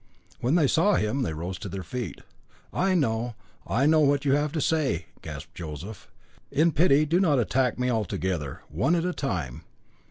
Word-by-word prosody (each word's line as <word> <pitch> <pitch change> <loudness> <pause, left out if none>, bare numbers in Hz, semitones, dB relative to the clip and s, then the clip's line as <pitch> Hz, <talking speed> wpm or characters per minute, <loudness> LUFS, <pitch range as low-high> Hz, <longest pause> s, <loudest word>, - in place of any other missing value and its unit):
When 130 +7 +1
they 165 -4 +4
saw 180 +8 +3
him 110 +6 0
they 115 - -1
rose 85 +4 -5
to - - -6
their 95 -1 -5
feet. 125 +3 -5 0.5
"I 190 0 +2
know, 120 -6 0 0.3
I 130 +4 +2
know 155 +1 +5
what 145 -1 +3
you 140 - +3
have 145 +1 +1
to 160 - -1
say," 155 - +1 0.2
gasped - - -8
Joseph. 85 +5 -8 0.4
"In 165 +3 +3
pity 150 -1 +4
do 165 +4 +2
not 160 -7 +3
attack 125 0 +1
me 125 0 0
all 110 -3 +1
together. 85 -6 -3
One 150 +8 +1
at 170 0 0
a 180 - 0
time. 85 - -3
135 Hz, 190 wpm, -26 LUFS, 105-155 Hz, 0.5 s, know